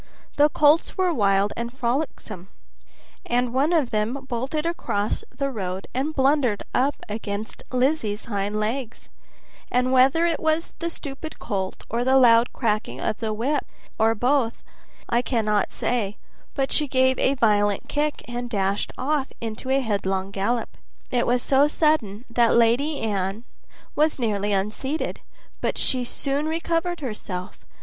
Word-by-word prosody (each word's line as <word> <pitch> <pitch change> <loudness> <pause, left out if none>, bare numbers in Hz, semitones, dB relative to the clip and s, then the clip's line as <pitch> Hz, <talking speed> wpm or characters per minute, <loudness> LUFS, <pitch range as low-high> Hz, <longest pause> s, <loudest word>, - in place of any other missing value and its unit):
The 295 +1 +5
colts 300 +5 +3
were 370 -2 +2
wild 200 -4 +2
and 235 +1 -4
frolicsome, 240 - -3 0.8
and 245 0 0
one 280 +5 +2
of 310 -8 +2
them 230 +5 -1
bolted 270 +6 -2
across 215 -11 -1
the 275 -1 -3
road 190 -4 -4
and 285 +5 -1
blundered 265 -5 +2
up 275 +3 +2
against 210 0 -5
Lizzie's 250 -5 0
hind 205 -1 -2
legs, 230 +2 -3 0.6
and 250 +1 +2
whether 265 +6 +5
it 335 -2 +1
was 315 +1 0
the 335 - -1
stupid 310 0 -6
colt, 190 -4 -3
or 235 +2 -1
the 260 +1 +4
loud 235 -2 +6
cracking 210 - -1
of 215 - -2
the 220 -2 -2
whip, 265 +7 0 0.4
or 225 +1 +4
both 245 0 +2
together, - - -32 0.4
I 235 - +3
cannot 215 -5 0
say, 215 -5 -1 0.4
but 270 -1 0
she 300 - +2
gave 260 -1 +2
a 275 - +2
violent 205 -4 +2
kick, 300 0 -1
and 245 0 -4
dashed 200 -2 0
off 280 +1 0
into 225 +3 -5
a 270 +1 +3
headlong 195 -4 -1
gallop. 215 +5 -2 0.3
It 245 -1 +1
was 245 0 +2
so 275 +1 +4
sudden 280 -9 +1
that 230 0 +3
Lady 245 +6 +3
Anne 200 0 -2 0.5
was 305 +1 +2
nearly 210 -4 0
unseated, 215 +10 -2 0.4
but - - -1
she 255 -1 +1
soon 280 +4 -2
recovered 330 +1 -1
herself. 205 -7 -5
245 Hz, 150 wpm, -24 LUFS, 210-280 Hz, 0.8 s, loud